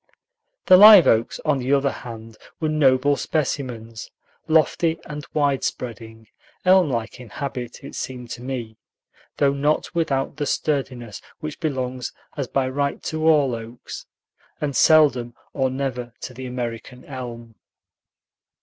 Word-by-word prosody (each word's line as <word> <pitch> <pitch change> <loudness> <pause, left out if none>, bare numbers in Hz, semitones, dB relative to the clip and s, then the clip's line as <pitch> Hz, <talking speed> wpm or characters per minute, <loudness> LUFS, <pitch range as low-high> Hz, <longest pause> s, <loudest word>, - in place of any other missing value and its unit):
The 185 - +8
live 205 -2 +10
oaks, 115 +1 +2
on 150 -3 +2
the 130 +2 -2
other 140 -1 +2
hand, 115 -2 -9 0.2
were 155 - 0
noble 145 -2 +3
specimens; 125 -7 -3 0.4
lofty 160 +1 +2
and 150 -1 -7
wide 140 -3 +1
spreading, 110 -2 -5 0.4
elm 185 -3 +5
like 115 -3 -3
in 125 -3 -11
habit, 125 +1 -6
it 140 - -9
seemed 125 -2 -6
to 120 - -6
me, 120 -4 -5 0.6
though 140 -1 +3
not 145 +4 0
without 150 -6 -1
the 145 -2 -2
sturdiness 130 -9 -2 0.2
which 155 -2 -6
belongs 130 -5 -3 0.2
as 140 -4 -3
by 135 0 0
right 140 +2 -2
to 155 0 -1
all 145 -5 +4
oaks, 115 +1 -8 0.5
and 145 -3 -2
seldom 135 -7 +4 0.2
or 130 -2 +1
never 130 -2 -4
to 125 - -7
the 130 +1 -7
American 125 0 -6
elm. 120 -4 -8
130 Hz, 140 wpm, -22 LUFS, 120-150 Hz, 0.6 s, live